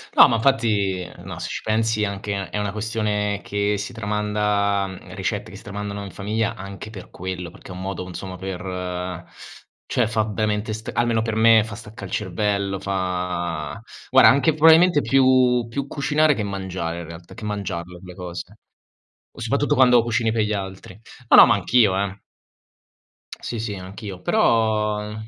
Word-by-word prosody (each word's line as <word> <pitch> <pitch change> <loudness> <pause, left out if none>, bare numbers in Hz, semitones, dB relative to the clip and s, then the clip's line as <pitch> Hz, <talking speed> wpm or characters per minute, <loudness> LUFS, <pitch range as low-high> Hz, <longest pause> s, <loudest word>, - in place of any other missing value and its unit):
No, - - +9
ma 120 - +1
infatti 105 -7 +1 0.2
no. - - -7
Se - - -5
ci - - -4
pensi, 110 0 +1
anche 100 -1 -3
è - - -4
una 105 -1 -1
questione 105 -1 -1
che 100 0 0
si 105 +5 -5
tramanda, 105 -2 0 0.2
ricette 100 +2 -3
che - - -11
si - - -13
tramandano 100 0 -5
in 100 - -7
famiglia 110 +3 -2
anche 100 +2 -8
per 100 -4 -11
quello, 90 -1 -5
perché - - -15
è - - -7
un 90 - -7
modo, 95 -1 -4
insomma, 95 +1 -7
per 90 -1 -5 0.6
cioè, 120 -3 +1
fa 110 0 +1
veramente 105 0 -1 0.2
almeno 120 -1 +1
per 110 -1 -2
me, 110 0 +6
staccà 105 -1 -9
il 95 - -9
cervello. 100 0 -1
Fa 90 -6 -3 0.3
guarda, - - +7
anche 140 +4 +3
probabilmente 160 +1 +6
più 130 -3 +4
più 140 +4 -3
cucinare 150 +2 +2
che 115 - -3
mangiare, 95 -4 -4
in - - -8
realtà, 85 +2 -11
che 105 - -8
mangiarle 90 -4 -4
quelle 90 0 -11
cose, 90 +1 -7 0.8
o - - -15
soprattutto - - +1
quando 125 -2 +6
cucini 115 -1 0
per 115 - +1
gli 105 - -2
altri. 95 0 -6 0.3
No, - - +8
no, - - +11
ma - - +4
anch'io, 110 -6 +3
eh. 100 0 -3 1.2
Sì, 120 - -5
sì, 110 -2 -3
anch'io, 95 0 -8
però 105 0 +1
105 Hz, 165 wpm, -22 LUFS, 95-110 Hz, 1.2 s, no